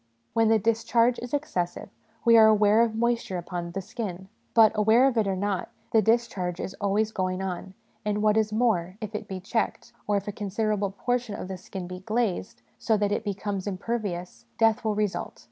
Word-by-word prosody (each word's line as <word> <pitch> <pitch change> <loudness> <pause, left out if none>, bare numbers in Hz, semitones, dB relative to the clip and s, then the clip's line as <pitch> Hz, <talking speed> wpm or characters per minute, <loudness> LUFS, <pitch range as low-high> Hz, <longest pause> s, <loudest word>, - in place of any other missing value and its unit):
When 225 -1 +3
the 225 0 +5
discharge 230 +2 +2
is 245 0 -7
excessive, 185 -12 -2 0.4
we 230 0 +7
are 220 -1 +8
aware 215 0 +5
of 230 -2 +1
moisture 235 -4 0
upon 175 0 -5
the 195 0 -4
skin; 190 -3 -6 0.3
but, 225 -2 +7
aware 220 +4 +4
of 270 -2 +2
it 220 -3 +2
or 195 - 0
not, 195 -1 -2 0.2
the 220 - +5
discharge 210 -6 0
is 190 - -5
always 205 +2 +1
going 185 -2 -1
on; 190 0 -5 0.3
and, 210 0 -1
what 215 0 +4
is 215 -1 +2
more, 205 -5 +1
if 215 0 -6
it 210 0 -5
be 190 -2 -5
checked, 225 +4 -2
or 205 -1 +2
if 200 - -4
a - - -1
con 205 0 -5
siderable 205 -1 -1
portion 245 -4 -1
of - - -6
the 190 - -5
skin 185 0 -7
be 180 +1 -7
glazed, 215 -1 -2 0.2
so 220 - +2
that 205 0 0
it 210 - 0
becomes 200 -1 -3
impervious, 195 -3 -4
death 225 +1 +3
will 215 -2 0
result. 210 -2 -2
210 Hz, 200 wpm, -26 LUFS, 190-225 Hz, 0.4 s, are